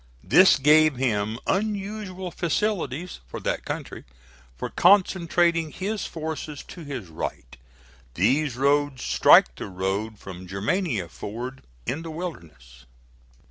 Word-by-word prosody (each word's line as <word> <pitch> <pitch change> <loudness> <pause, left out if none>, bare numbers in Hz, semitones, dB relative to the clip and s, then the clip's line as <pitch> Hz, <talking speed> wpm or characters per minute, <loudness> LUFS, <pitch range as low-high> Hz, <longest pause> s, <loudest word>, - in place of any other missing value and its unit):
This 180 - +6
gave 150 +1 +5
him 110 -4 0
unusual 195 -2 -2
facilities, 175 - -2
for - - -7
that - - -2
country, - - -5 0.5
for - - -5
concentrating 175 -3 +3
his 200 +4 -3
forces 155 -2 -5
to 175 - -9
his 130 - -6
right. 70 -6 -6 0.6
These 130 - +2
roads 140 -1 +1
strike - - +6
the - - -5
road 100 +3 -3
from 95 -2 -10
Germania 105 - -1
Ford 120 +10 -7 0.2
in 145 - -2
the 165 - -7
Wilderness. 80 - -8
145 Hz, 115 wpm, -25 LUFS, -, 0.6 s, This